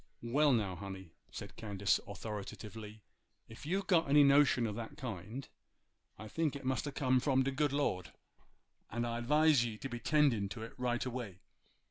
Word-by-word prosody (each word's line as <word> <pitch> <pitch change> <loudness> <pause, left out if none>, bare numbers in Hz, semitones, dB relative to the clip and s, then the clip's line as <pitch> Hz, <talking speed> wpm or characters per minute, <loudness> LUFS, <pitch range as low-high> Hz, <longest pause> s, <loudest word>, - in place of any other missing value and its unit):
'Well, 145 +5 +3
now, 105 -7 +1
honey,' 95 -3 -8 0.2
said - - -8
Candace, 100 -3 +1
authoritatively, 105 +1 -7 0.4
'ef 115 +5 -11
you've 190 +4 0
got 170 -6 +3
any 145 +1 +7
notion 140 -3 +5
o' 105 - -2
that 115 +1 -7
kind, 120 - -6 0.7
I 110 - -8
think 155 +5 -1
it 140 -1 -7
must 130 +1 0
a - - -3
come 130 -2 +2
from 130 0 +2
de 135 - 0
good 145 +1 +1
Lord; 95 - -1 0.8
and 120 +2 -2
I 120 0 -2
'vise 150 +1 +4
ye 115 -2 -4
to 135 - -6
be 120 -1 -5
'tendin' 130 -7 +2
to 110 +3 -6
it 115 - -8
right 120 -1 0
away. 120 -7 -5
120 Hz, 175 wpm, -34 LUFS, 105-140 Hz, 0.8 s, any